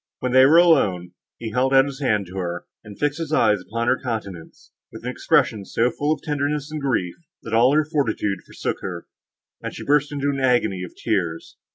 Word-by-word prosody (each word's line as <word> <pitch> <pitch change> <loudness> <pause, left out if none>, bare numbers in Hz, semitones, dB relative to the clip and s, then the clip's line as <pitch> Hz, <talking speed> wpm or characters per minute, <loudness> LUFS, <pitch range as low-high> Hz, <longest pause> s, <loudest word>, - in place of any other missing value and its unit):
When 125 - -3
they 130 +1 +7
were 160 +4 +6
alone, 105 - +3 0.3
he 115 -2 -6
held 130 +4 +1
out 135 0 +6
his 140 -1 -7
hand 105 -7 +1
to 90 +2 -10
her, 85 -1 -4 0.2
and 105 -2 -12
fixed 145 +4 -1
his 160 -2 -4
eyes 105 -10 +3
upon 115 +5 -3
her - - +2
countenance, 100 - -6 0.2
with - - -11
an - - -3
expression 105 -3 +1
so 115 +5 0
full 145 +1 -1
of 155 - -2
tenderness 145 0 -2
and 155 -1 -4
grief, 110 -11 -1 0.3
that 115 - -7
all 125 +5 +4
her 155 0 +3
fortitude 120 - -1
forsook - - -4
her, 85 -2 -6 0.6
and - - -6
she - - -8
burst 145 0 +2
into 145 0 -1
an 140 - -3
agony 120 -8 +1
of 90 - -9
tears. 80 -3 -2
125 Hz, 210 wpm, -22 LUFS, 100-145 Hz, 0.6 s, they